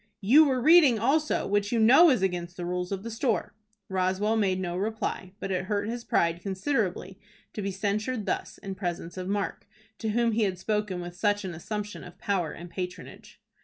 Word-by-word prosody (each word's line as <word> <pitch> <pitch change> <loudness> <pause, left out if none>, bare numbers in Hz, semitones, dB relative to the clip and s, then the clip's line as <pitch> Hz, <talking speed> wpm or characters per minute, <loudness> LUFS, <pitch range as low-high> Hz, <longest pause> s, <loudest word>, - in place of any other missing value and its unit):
You 270 +11 +7
were 260 -3 +1
reading 305 -3 +6
also, 290 +8 +1
which 205 0 0
you 235 - +1
know 260 +10 +7
is 250 -9 +2
against 175 -2 -2
the 175 - -4
rules 180 +1 -3
of 195 0 -3
the 230 - -5
store." 225 -3 -1 0.3
Roswell 190 +3 0
made 195 -4 +1
no 175 -2 -3
reply, 200 -2 -3
but 195 - -4
it 185 0 -1
hurt 205 +1 -1
his 240 0 -4
pride 170 -5 +1
considerably 190 -2 -2 0.3
to 210 - -4
be 200 - -2
censured 210 +4 -2
thus 190 - -3
in 195 -2 -6
presence 175 -3 -4
of 185 -1 -5
Mark, 200 0 -3 0.3
to 220 - -2
whom 235 +2 +2
he 225 +1 0
had 190 -4 0
spoken 210 -1 -2
with 175 0 -7
such 205 +2 0
an 180 - -4
assumption 210 +5 -5
of 180 - -12
power 180 -6 -1
and 175 +1 -10
patronage. 180 -1 -7
200 Hz, 200 wpm, -27 LUFS, 185-220 Hz, 0.3 s, You